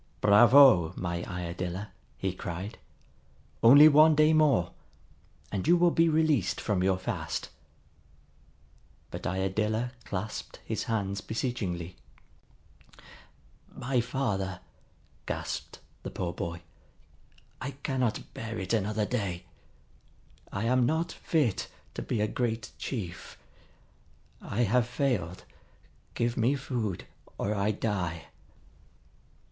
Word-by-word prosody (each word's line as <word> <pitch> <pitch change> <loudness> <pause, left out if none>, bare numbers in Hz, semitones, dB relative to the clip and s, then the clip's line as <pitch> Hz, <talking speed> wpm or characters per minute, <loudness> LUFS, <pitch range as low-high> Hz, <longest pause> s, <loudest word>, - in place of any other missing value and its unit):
"Bravo, 105 - +7
my 85 -1 -3
Iadilla!" 90 +2 -4 0.3
he - - -2
cried. 95 +6 -6 0.8
"Only 140 +7 +9
one 155 +1 +7
day 155 +1 +5
more, 140 - +3 0.8
and 100 +4 -2
you 175 +1 +6
will 175 0 +4
be 165 0 +3
released 155 - +2
from 100 -3 0
your 95 0 +2
fast." 95 - -4 1.6
But - - -5
Iadilla 105 +5 -1
clasped 105 +2 -5
his - - -3
hands 100 -3 -2
beseechingly. 95 -8 -3 1.7
"My 125 0 0
father," 105 -8 -2 0.7
gasped - - -4 0.2
the - - -6
poor 85 -1 -3
boy. 85 +1 -5 1.0
"I 130 - -3
cannot 130 -4 -1
bear 115 0 -5
it 95 +3 -3
another 105 0 0
day. 100 -7 -3 1.1
I 100 - -3
am 125 +1 +3
not 160 +4 0
fit 145 - 0 0.3
to - - -5
be 110 - -2
a 105 - +2
great 115 -1 -2
chief. 90 -9 -6 1.0
I 110 - -2
have 120 +2 +2
failed. 115 - -1 0.7
Give 120 0 0
me 125 +5 +3
food, 120 -8 -3 0.3
or 100 - -1
I 100 0 0
die!" 95 -7 -2
110 Hz, 110 wpm, -29 LUFS, 95-130 Hz, 1.7 s, Only